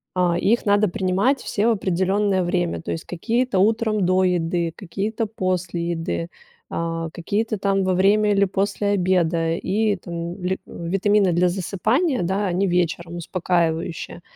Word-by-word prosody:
А, 175 -2 +2
их 230 +7 +2
надо 205 0 +4
принимать 195 +9 +1
все 210 +2 0
в - - +5
определенное 190 0 +1
время, 175 -1 -1
то - - -5
есть, 165 - -4
какие-то 230 +4 -1
утром 215 0 +2
до 185 +1 +3
еды, 170 -2 0
какие-то 210 +4 -3
после 180 -4 -2
еды, 85 - -3 0.4
а, 165 0 -2
какие-то, 210 +6 -2
там, 195 0 +1
во 185 0 +1
время, 205 +3 +3
или 200 0 +4
после 200 +2 -1
обеда, 175 -4 +1
и, 205 +4 0
там, 170 +1 -6
ле 185 +1 -1
витамины 195 +2 +1
для 180 +1 +3
засыпания, 215 - 0
да, 190 +4 0
они 185 +2 +1
вечером, 175 -1 -1
успокаивающие. 170 -1 -2
185 Hz, 145 wpm, -22 LUFS, 170-205 Hz, 0.4 s, в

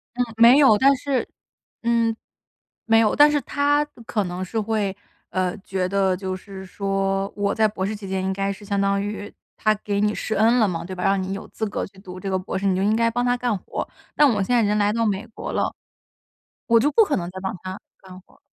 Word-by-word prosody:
嗯， 250 0 +1
没 235 +3 +8
有， 265 -8 +6
但 275 +4 +5
是 270 -1 -1 0.6
嗯。 230 -1 +2 0.7
没 225 0 +5
有， 215 -2 +2
但 295 +1 +7
是 295 - +1
他 290 +1 +1 0.2
可 210 -3 -1
能 180 +1 -4
是 220 +4 -2
会， 205 -3 -1 0.3
呃， 185 +2 -1
觉 190 -2 -3
得 190 -1 +1
就 185 0 -4
是 190 0 -10
说， 195 0 -1
我 200 -1 0
在 220 -1 +3
博 190 -2 -3
士 215 - -3
期 200 -2 -9
间 190 0 -1
应 190 - -1
该 195 +1 -1
是 200 +1 -12
相 200 0 -1
当 200 0 +1
于， 205 0 -5 0.2
他 215 - +2
给 200 -1 -1
你 210 0 +2
施 220 - -3
恩 225 +4 +4
了 220 - +4
嘛， 170 -2 -3
对 185 - -7
吧， 180 - -4
让 195 0 +2
你 190 - -4
有 195 - -6
资 220 - -4
格 205 - -3
去 190 0 -19
读 185 -1 -9
这 195 - -5
个 190 - 0
博 185 +1 -4
士， 200 - -2
你 190 - +3
就 190 - 0
应 210 +2 +2
该 230 0 +3
帮 245 +1 -1
他 245 0 +2
干 245 -4 -1
活。 - - -5 0.3
但 295 - +6
我 210 -6 +1
现 245 +6 +1
在 - - +4
已 - - +2
经 210 - +1
来 205 0 +2
到 230 0 0
美 205 +1 -1
国 220 - -7
了， - - 0 0.9
我 230 -1 +5
就 285 +6 +1
不 455 - +6
可 300 - 0
能 175 -1 -3
再 185 - -8
帮 190 +1 -3
他 185 +1 -6 0.2
干 185 -1 -12
活 - - -26
儿。 - - -28
205 Hz, 270 characters per minute, -23 LUFS, 190-230 Hz, 0.9 s, 没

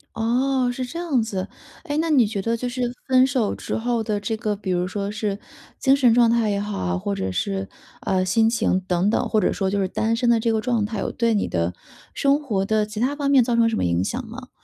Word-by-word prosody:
哦， 250 +3 +1
是 255 - -4
这 325 +7 -6
样 305 -8 +1
子。 195 -3 -4 0.4
哎， 290 - -3
那 325 +1 0
你 260 -8 +4
觉 205 -2 -3
得 230 +3 -1
就 250 +2 -3
是 250 +1 -4 0.3
分 260 0 +5
手 260 -6 0
之 - - -4
后 235 0 -1
的 210 -2 -1
这 205 +2 -2
个 210 -1 -2
比 195 -1 -6
如 180 0 +1
说 200 +1 -3
是 210 -1 -3 0.4
精 270 0 +4
神 255 -4 +4
状 235 -1 +5
态 230 -2 +2
也 200 - 0
好 205 0 -4
啊， 90 -1 -1
或 100 +2 -3
者 95 -1 -3
是， 95 +1 -2 0.3
呃， 190 -1 0
心 225 +4 +3
情 225 -5 +1
等 180 +1 0
等， - - 0
或 220 - +2
者 205 - +1
说 195 -1 -1
就 200 - 0
是 190 - +1
单 220 +4 -1
身 240 +1 +1
的 235 - +5
这 230 +1 +1
个 220 - +1
状 230 -2 0
态 210 -1 -4
有 - - -2
对 235 -2 +1
你 205 - 0
的 85 0 -1 0.4
生 280 +1 +2
活 205 -9 -1
的 215 +1 +1
其 215 0 -7
他 265 +4 0
方 280 -1 -1
面 270 - +6
造 235 0 0
成 230 -1 +4
什 225 - -2
么 - - 0
影 85 +1 +1
响 245 - -3
吗？ 250 +3 -10
225 Hz, 280 characters per minute, -23 LUFS, 200-245 Hz, 0.4 s, 面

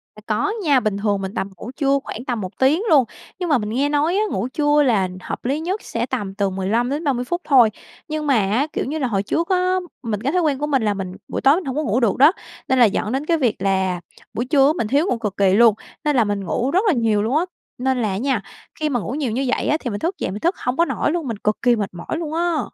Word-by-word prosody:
À, 215 - -13
có 220 - 0
nha, 285 -5 +4
bình 215 -4 -1
thường 200 -1 0
mình 190 +1 -5
tầm 195 - -3
ngủ 240 - -7
trưa 280 -1 +2
khoảng 245 - -7
tầm 240 -5 -2
1 185 - -7
tiếng 285 +8 +3
luôn. 285 -5 +6 0.4
Nhưng 355 -2 -2
mà 290 - +4
mình 210 -2 -3
nghe 275 +6 0
nói 300 +5 +1
á, - - +2
ngủ 210 +6 -2
trưa 295 +2 +2
là 210 -8 +2
hợp - - -6
lý 280 +4 0
nhất 370 +6 -3
sẽ 230 +1 -2
tầm 205 -7 -4
từ 200 -2 0
15-30 245 - -1
phút 345 +7 -2
thôi. 250 -6 +5 0.4
Nhưng 305 -1 -3
mà 275 - +4
á, 220 +8 +1
kiểu - - -1
như 300 +4 -3
là, 260 - 0
hồi 200 -3 0
trước 335 - -1
á, 365 0 +2 0.3
mình 215 -3 -3
cái 275 +4 0
thói 360 - +3
quen 290 -4 0
của 295 - -1
mình 270 -6 +1
là 210 -1 +1
mình 190 -1 -5
buổi - - -4
tối 275 +3 +6
mình 360 - -3
hông 265 - -3
có 305 - 0
ngủ 230 +1 +1
được 230 -5 +1
đó, 290 +5 +7 0.4
nên 260 -1 +2
là 240 - +8
dẫn 210 +1 0
đến 270 +3 -2
cái 330 0 +2
việc 245 -7 +1
là 190 -2 0 0.3
buổi 240 - -2
trưa 275 -1 +4
á, 305 - +3
mình 215 - -1
thiếu 285 +8 +2
ngủ 245 - 0
cực 210 -4 -4
kỳ 195 -2 +3
luôn, 225 0 +6 0.3
nên 295 -2 +2
là 235 - +5
mình 205 -1 -2
ngủ 255 +9 -1
rất 370 - +3
là 370 - +4
nhiều 225 -4 +1
luôn 255 +7 +1
á. 345 - +1 0.3
Nên 260 0 0
là 215 - 0
á 190 - -2
nha, 250 -1 0 0.4
khi 305 - 0
mà 245 -4 0
ngủ 220 - -5
nhiều 275 -5 -2
như 265 +4 -1
vậy 255 - 0
á 305 - +2
thì 245 - -4
mình 205 - -4
thức 355 +4 -2
dậy - - -3
mình 205 - -5
thức 345 +3 +1
hông 250 +2 -2
có 335 - +4
nổi 305 - -1
luôn, 330 -5 -2
mình 225 -3 -3
cực 210 +1 -1
kỳ 245 -1 +4
mệt 205 -3 -2
mỏi 175 - -5
luôn 315 -2 -4
á! 335 -2 +1
255 Hz, 290 wpm, -21 LUFS, 210-300 Hz, 0.4 s, là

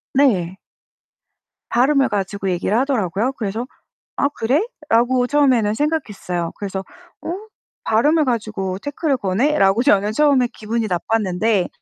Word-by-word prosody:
네. 190 -10 +2 1.1
발음을 270 +3 +3
가지고 195 -1 -2
얘기를 185 +5 0
하더라고요. 245 - 0
그래서 225 +1 -4 0.5
'아 280 - +2
그래?'라고 260 - 0
처음에는 250 -7 +2
생각했어요. 205 - -2
그래서 195 -2 -4 0.4
'어? 345 - -3 0.5
발음을 295 +8 +3
가지고 210 -6 -2
태클을 285 +2 -1
거네?'라고 200 +1 +2
저는 205 -5 +3
처음에 270 -2 +3
기분이 225 +1 -2
나빴는데 195 +1 0
225 Hz, 310 characters per minute, -20 LUFS, 195-275 Hz, 1.1 s, 발음을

